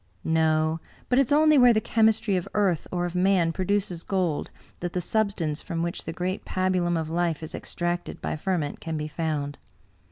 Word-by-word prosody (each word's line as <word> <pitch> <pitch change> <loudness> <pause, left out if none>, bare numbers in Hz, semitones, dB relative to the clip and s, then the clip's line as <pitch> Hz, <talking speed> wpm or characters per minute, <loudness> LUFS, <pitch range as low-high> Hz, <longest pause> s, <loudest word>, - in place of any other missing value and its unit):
" - - -38
No. 160 0 +2 0.3
But 250 - +4
it 275 - +3
is - - -8
only 305 0 +6
where 245 -1 +7
the 215 - +3
chemistry 220 -2 +2
of 180 - -1
earth 195 -6 +1
or 175 -1 -1
of 175 - -4
man 180 -2 +3
produces 190 -2 -1
gold, 180 -6 -1 0.3
that 175 0 -4
the 180 - 0
substance 180 -6 0
from 165 0 -3
which 170 0 -4
the - - -3
great 180 +3 -3
pabulum 185 -2 0
of 160 0 -4
life 170 -2 0
is 155 - -7
extracted 175 0 -3
by - - -3
ferment 155 -3 -2
can 160 -1 -4
be 150 0 -3
found. 150 -3 -3
175 Hz, 195 wpm, -26 LUFS, 160-195 Hz, 0.3 s, where